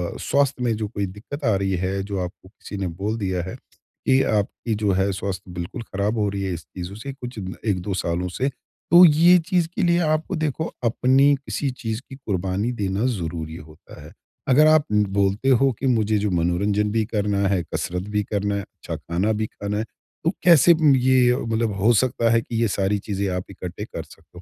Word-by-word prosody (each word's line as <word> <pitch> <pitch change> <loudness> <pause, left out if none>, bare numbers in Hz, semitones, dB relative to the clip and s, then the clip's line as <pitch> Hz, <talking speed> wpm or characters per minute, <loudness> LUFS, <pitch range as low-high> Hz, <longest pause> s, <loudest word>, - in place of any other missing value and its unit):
अ, - - -6
स्वास्थ्य 140 -2 +1
में 115 -2 +1
जो 110 -1 -2
कोई 100 -1 -3
दिक्कत 105 +10 -8
आ 110 -3 +3
रही 95 0 0
है 95 +1 -1
जो 100 -1 -4
आपको 90 +1 -9
किसी 100 - -9
ने 95 -1 -2
बोल 100 +6 -3
दिया 95 -4 -1
है - - -6 0.5
कि 130 0 +4
आपकी 105 +2 -1
जो 105 -1 0
है 100 +1 +1
स्वास्थ्य 95 -1 -5
बिल्कुल 85 +5 -5
ख़राब 105 +2 -2
हो 105 -1 +1
रही 100 0 -3
है 95 -2 -2
इस 80 -2 -7
चीज़ों 90 +1 -6
से 135 +6 -7
कुछ 125 -3 -8 0.3
1-2 100 -1 -1
सालों 90 -1 -1
से। 135 +2 +2 0.4
तो 175 +1 +9
ये 170 +3 +6
चीज़ 180 -4 +2
के - - -1
लिए 170 0 +3 0.2
आपको 160 +5 -4
देखो 155 0 -2
अपनी 130 +5 +4
किसी 140 +1 -3
चीज़ 110 0 -2
की 135 - -8
कुर्बानी 100 -3 -2
देना 100 +3 0
ज़रूरी 80 -1 -5
होता 75 -2 -13
है। 75 +4 -13 0.4
अगर 150 +4 +6
आप 155 -1 +5
बोलते 100 +3 +1
हो 135 +1 +4
कि 135 - -1
मुझे 110 -4 +2
जो 105 +1 0
मनोरंजन 100 +5 +1
भी 110 +1 +1
करना 100 -2 0
है, 95 -2 +1
कसरत 90 +1 -2
भी 105 - +2
करना 100 0 -1
है, 100 - -1
अच्छा - - -8
खाना 90 +6 -1
भी 110 +1 -1
खाना 105 0 -4
है। 110 - 0 0.4
तो 165 - +3
कैसे 170 -1 +7
म 155 -4 +4
ये 125 -1 +4
मतलब 115 -3 -1
हो 110 +5 +4
सकता 115 0 +2
है 115 0 +4
कि 115 - -7
ये 115 - +3
सारी 100 0 0
चीज़ें 100 -1 -3
आप 90 - -2
इकट्ठे - - -7
कर - - -7
सकते - - -18
हो? - - -10
105 Hz, 210 wpm, -23 LUFS, 95-130 Hz, 0.5 s, तो